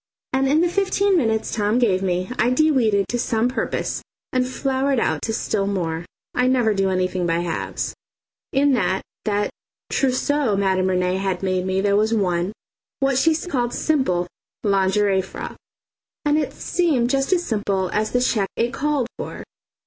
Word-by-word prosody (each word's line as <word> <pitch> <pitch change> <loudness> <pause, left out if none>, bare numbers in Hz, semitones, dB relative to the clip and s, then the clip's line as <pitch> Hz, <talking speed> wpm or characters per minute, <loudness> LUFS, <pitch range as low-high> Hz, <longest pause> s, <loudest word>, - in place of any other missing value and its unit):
And 265 +1 +2
in 300 +4 +3
the 350 - +3
fifteen 395 +2 +2
minutes 225 -8 +1
Tom 210 +1 +1
gave 205 -7 +2
me 185 +2 -1
I 240 - +4
de 310 +5 +3
weeded 215 -8 +2
to 240 - -1
some 225 0 +1
purpose 250 - -2 0.3
and 255 -1 +2
flowered 265 0 0
out - - 0
to 225 - -2
still 210 -2 -1
more. 170 -4 -2 0.3
I 250 0 +2
never 245 -4 +3
do 195 -1 +1
anything 185 -1 0
by 165 0 +1
halves. 170 -2 -3 0.6
In 280 +1 +3
that 195 -6 +1 0.2
that 205 -1 0 0.4
trousseau 265 -3 +1
Madame 190 -1 +2
Rene 180 0 +1
had 190 -1 -2
made 185 -1 0
me 190 +1 +1
there 200 0 +2
was 215 +2 +2
one, 180 -2 0 0.5
what 270 -1 +2
she 320 +3 +4
called 270 -8 -2
"simple" 260 - +1 0.4
lingerie 195 0 +2
frock. 190 - -7 0.7
And 295 0 +3
it 300 - +1
looked 280 -9 0
just 270 +3 +1
as 350 -2 +2
simple 200 -4 -1
as 215 +1 +1
the 245 - +1
cheque 210 -5 +1
it 235 +2 0
called 290 -3 0
for. - - -6
220 Hz, 170 wpm, -22 LUFS, 190-270 Hz, 0.7 s, I